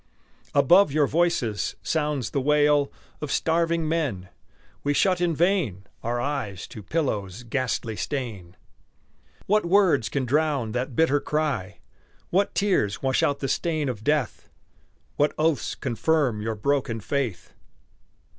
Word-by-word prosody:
Above 170 +6 +6
your 150 0 +3
voices 135 - 0
sounds 150 -6 -1
the 140 - 0
wail 145 0 +3 0.3
Of 150 -2 -4
starving 165 +1 +1
men; 135 - -2 0.5
we 145 0 +1
shut 185 +1 +2
in 170 -2 +1
vain 155 - +1 0.2
Our 120 +1 -2
eyes 120 -9 -3
to 110 - -9
Pillow's 105 - -2
ghastly 120 -2 -2
stain. 105 -10 -5 0.9
What 210 +2 +3
words 170 - +3
can 140 -2 -1
drown 140 -3 +1
that 125 +2 -3
bitter 145 -1 +3
cry? 140 -11 -2 0.5
What 195 +3 +1
tears 185 - +1
wash 130 -1 +2
out 140 -1 +1
the 135 - -1
stain 155 -1 -1
of 110 -4 -5
death? 150 -3 -1 0.7
What 145 +1 +2
oaths 155 -2 0
confirm 135 -2 0
your 110 +1 -2
broken 125 0 0
faith? 120 -3 -3
140 Hz, 130 wpm, -25 LUFS, 115-160 Hz, 0.9 s, Above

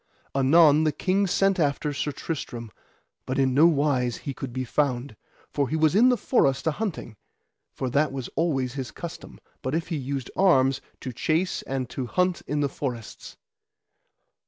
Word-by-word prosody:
Anon 150 +3 +5
the 155 - +2
king 190 +6 +1
sent 195 +1 +2
after 145 -1 0
Sir 145 +2 -2
Tristram, 120 -6 -5 0.6
but 130 - -2
in 135 -1 +2
no 150 +5 +6
wise 140 -6 +1
he 140 - -5
could 130 0 -6
be 130 +1 -3
found, 130 -2 -1 0.4
for 140 -3 0
he 155 - -1
was 155 0 +3
in 235 +6 +6
the 250 - +3
forest 140 - +1
a 160 - +3
hunting; 160 - -5 0.5
for 130 - -4
that 145 +4 +1
was 135 -2 -5
always 135 -7 0
his 135 -3 -4
custom, 170 - -9 0.2
but 130 +4 -2
if 165 +1 -2
he 165 - -1
used 135 -1 -4
arms, 135 -9 +3 0.2
to 130 - -5
chase 160 +9 0
and 135 -2 -3
to 130 -2 -4
hunt 180 +5 0
in 150 0 -1
the 145 - +2
forests. 125 -6 -6
140 Hz, 175 wpm, -25 LUFS, 130-165 Hz, 0.6 s, no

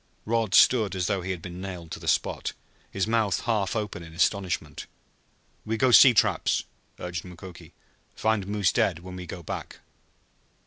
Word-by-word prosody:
Rod 115 -2 +1
stood 110 -6 +5
as 90 -2 -1
though 100 -1 0
he 90 - -6
had 90 -3 -4
been 90 0 -7
nailed 90 -4 -7
to - - -5
the - - -9
spot, - - 0 0.4
his 95 - -1
mouth 110 -3 +1
half 105 -4 -1
open 105 -5 -3
in 80 -1 -11
astonishment. 85 -5 -1 0.8
"We 110 +1 -2
go 130 +3 +3
see 130 +2 +9
traps," - - +2 0.4
urged 90 -1 -5
Mukoki. 90 -2 -12 0.4
"Find 110 -3 0
moose 100 -2 +1
dead 90 - +1
when 95 0 -8
we 90 -1 -8
go 85 +1 -8
back." - - -6
95 Hz, 170 wpm, -26 LUFS, 90-110 Hz, 0.8 s, see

